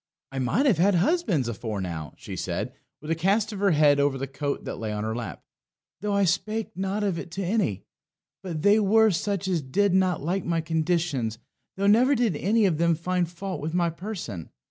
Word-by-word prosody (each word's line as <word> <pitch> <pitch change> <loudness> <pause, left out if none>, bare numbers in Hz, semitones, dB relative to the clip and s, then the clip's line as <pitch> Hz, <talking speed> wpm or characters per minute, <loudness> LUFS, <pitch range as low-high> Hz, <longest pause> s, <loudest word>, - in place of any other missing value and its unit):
"I 135 - -4
might 165 - +1
have 220 - +3
had 195 +2 +4
husbands 190 - +1
afore 110 -2 -4
now," 85 -5 -5
she - - -8
said, - - -3 0.3
with 150 +2 -5
a - - +2
cast 200 +6 +1
of 200 - -6
her 200 0 +3
head 150 -3 +4
over 140 -1 +2
the 135 - -3
coat 140 +1 -4
that - - -5
lay 110 -1 -3
on 105 0 -3
her 110 +1 -2
lap, 120 -1 -6 0.6
"though 205 +2 -2
I 200 - +3
spake 215 +5 -1
not 195 +3 -2
of 190 -5 0
it - - -7
to 195 - -3
any. 180 - 0 0.6
But 170 -5 -5
they 205 +2 +5
were 220 +1 +4
such 195 +2 -1
as 180 -4 +1
did 185 +9 +1
not 185 -3 +2
like 175 +5 -1
my 170 -1 0
conditions, 160 -7 -1 0.4
though 200 - 0
never 245 +7 +5
did 230 - +1
any 210 +8 +2
of 165 -5 +1
them 170 0 +3
find 180 +1 -1
fault 185 +2 -5
with 160 +3 -3
my 170 -2 +2
person. 165 - -6
175 Hz, 210 wpm, -26 LUFS, 145-200 Hz, 0.6 s, they